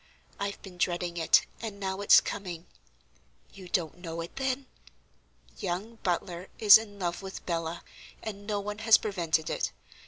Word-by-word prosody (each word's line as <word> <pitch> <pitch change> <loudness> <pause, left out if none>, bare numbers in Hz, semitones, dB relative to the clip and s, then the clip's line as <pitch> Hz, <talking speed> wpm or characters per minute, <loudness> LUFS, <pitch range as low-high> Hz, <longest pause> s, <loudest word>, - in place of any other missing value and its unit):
I've 200 0 -3
been 180 -2 -11
dreading 175 -1 0
it, 165 - +5 0.2
and 215 -3 -6
now 190 0 -3
it's 200 - +8
coming. 180 -4 -5 0.9
You 190 -2 -11
don't 170 -1 -1
know 165 -2 -5
it, 165 - -8
then? 265 0 -1 0.9
Young 200 +4 -3
Butler 175 -1 -2
is 215 -1 +9
in 205 -2 -10
love 175 -2 -2
with 190 0 -8
Bella, 165 -1 -3 0.4
and 205 -2 -6
no 210 -1 0
one 210 +1 -5
has 220 0 +7
prevented 170 -6 0
it. - - -1
190 Hz, 155 wpm, -29 LUFS, 175-205 Hz, 0.9 s, is